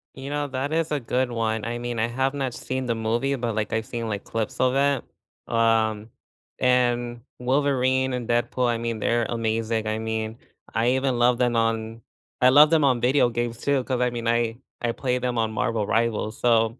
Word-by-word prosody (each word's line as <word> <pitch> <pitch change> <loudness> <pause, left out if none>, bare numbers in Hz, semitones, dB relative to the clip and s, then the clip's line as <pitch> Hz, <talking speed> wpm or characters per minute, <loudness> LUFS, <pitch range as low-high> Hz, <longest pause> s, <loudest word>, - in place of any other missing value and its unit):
You 135 +1 -7
know 145 0 -1
that 135 +3 -3
is 165 -1 0
a 150 - +1
good 125 +1 -1
one. 110 -1 -1
I 120 +1 -3
mean, 120 -1 -4
I 115 - +2
have 130 +3 -1
not 135 -4 -2
seen 130 -1 -4
the 115 - 0
movie, 120 +5 0
but 120 -3 -2
like 105 -1 -2
I've 110 0 -1
seen 115 -2 -4
like 100 -1 -3
clips 115 -2 -4
of 130 +1 +2
it. 140 -2 +2 0.5
Um, 110 -1 +2 0.5
and 120 -1 +1 0.2
Wolverine 130 0 +1
and 125 -2 -3
Deadpool, 120 +1 +1
I 120 -1 +1
mean, 115 -2 -3
they're 120 +1 +1
amazing. 115 -1 -1
I 110 +1 -1
mean, 110 0 -3 0.4
I 115 +2 +2
even 130 -2 0
love 120 0 +4
them 120 -2 +1
on 115 0 -1 0.4
I 125 - +7
love 150 +3 +7
them 160 -3 +4
on 125 -3 +2
video 125 0 +3
games 120 0 -3
too, 140 -2 +1
'cause 125 -1 -2
I 125 - +3
mean, 120 -1 -4
I 115 -1 +1 0.2
I 120 -1 0
play 125 -1 -1
them 125 -1 -2
on 110 -1 +1
Marvel 110 0 -1
Rivals, 110 -1 0
so, 115 0 +2
120 Hz, 205 wpm, -24 LUFS, 115-130 Hz, 0.5 s, I